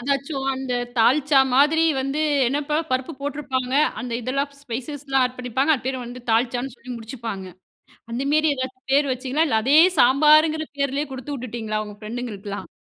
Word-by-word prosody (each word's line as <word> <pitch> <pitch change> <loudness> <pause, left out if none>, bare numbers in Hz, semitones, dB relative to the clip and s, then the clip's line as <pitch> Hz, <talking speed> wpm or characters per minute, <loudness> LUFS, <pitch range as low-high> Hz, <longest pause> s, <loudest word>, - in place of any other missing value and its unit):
அதாச்சும் 275 +1 -2
அந்த 260 -1 -4 0.3
"தால்ச்சா" 275 +4 +4
மாதிரி 300 +5 +4 0.2
வந்து 275 +3 -2 0.3
"என்னப்பா 295 +2 -1
பருப்பு 255 +5 -1
போட்ருப்பாங்க. 270 -3 -3 0.3
அந்த 245 -2 -5
இதெல்லாம் 275 +4 -2
ஸ்பைசஸ்லாம் 270 +2 -2
ஆட் 250 - -11
பண்ணிப்பாங்க 260 +5 +1
அது 250 - -6
பேர் 265 0 -1
வந்து 245 +1 -8
'தால்சா'ன்னு 245 +2 0
சொல்லி 255 - -12
முடிச்சுப்பாங்க." 225 -4 -6 0.7
அந்த 240 +3 -2
மேரி 310 -1 +3
ஏதாச்சும் 260 0 -6
பேர் 285 -1 +3
வச்சிங்களா? 265 +5 0
இல்ல 220 -4 +2
அதே 280 +4 +4 0.2
"சாம்பாரு"ங்கிற 305 +4 +5
பேர்லேயே 280 +1 0
குடுத்து 265 +3 -6
விட்டுட்டீங்களா 225 -4 -4
உங்கள 210 -1 -10
ஃப்ரெண்டுகளுக்கலாம்? 215 -3 -6
260 Hz, 150 wpm, -23 LUFS, 245-285 Hz, 0.7 s, சாம்பாரு"ங்கிற